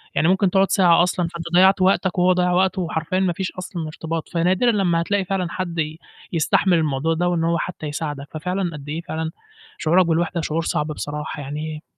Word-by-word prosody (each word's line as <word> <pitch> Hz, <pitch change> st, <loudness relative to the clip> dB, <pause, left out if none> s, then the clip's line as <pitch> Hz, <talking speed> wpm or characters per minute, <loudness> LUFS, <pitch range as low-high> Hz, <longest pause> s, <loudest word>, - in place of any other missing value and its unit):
يعني 160 Hz, -, +3 dB
ممكن 190 Hz, +1 st, +3 dB
تقعد 195 Hz, 0 st, +3 dB
ساعة 175 Hz, -4 st, +5 dB
أصلًا، 180 Hz, -1 st, 0 dB
فأنت 170 Hz, 0 st, -7 dB
ضيعت 190 Hz, +1 st, +5 dB
وقتك 190 Hz, 0 st, +2 dB
وهو 180 Hz, +1 st, +5 dB
ضيّع 180 Hz, 0 st, +1 dB
وقته 185 Hz, +1 st, +2 dB
وحرفيًا 165 Hz, +2 st, -2 dB
ما 185 Hz, -2 st, +1 dB
فيش 185 Hz, +2 st, -3 dB
أصلًا 180 Hz, -3 st, -6 dB
ارتباط، 160 Hz, +1 st, -5 dB
فنادرًا 185 Hz, +7 st, +2 dB
لمّا 180 Hz, -6 st, +1 dB
هتلاقي 200 Hz, +2 st, 0 dB
فعلًا 185 Hz, -1 st, -1 dB
حدّ 175 Hz, -3 st, -4 dB
ي 155 Hz, +1 st, -2 dB, 0.3 s
يستحمل 170 Hz, +2 st, +3 dB
الموضوع 155 Hz, 0 st, 0 dB
ده 175 Hz, +2 st, 0 dB
وإن 170 Hz, -2 st, 0 dB
هو 170 Hz, +1 st, +1 dB
حتى 170 Hz, -2 st, -5 dB
يساعدك، 145 Hz, -1 st, -4 dB
ففعلًا 180 Hz, +3 st, -2 dB
قد 145 Hz, -1 st, -9 dB
إيه 160 Hz, +3 st, -3 dB
فعلًا 160 Hz, -1 st, -4 dB, 0.5 s
شعورك 175 Hz, +3 st, +3 dB
بالوحدة 170 Hz, +1 st, 0 dB
شعور 155 Hz, +1 st, -1 dB
صعب 150 Hz, -2 st, -1 dB
بصراحة 150 Hz, 0 st, -5 dB
يعني 150 Hz, +3 st, -5 dB
170 Hz, 195 wpm, -22 LUFS, 160-185 Hz, 0.5 s, ساعة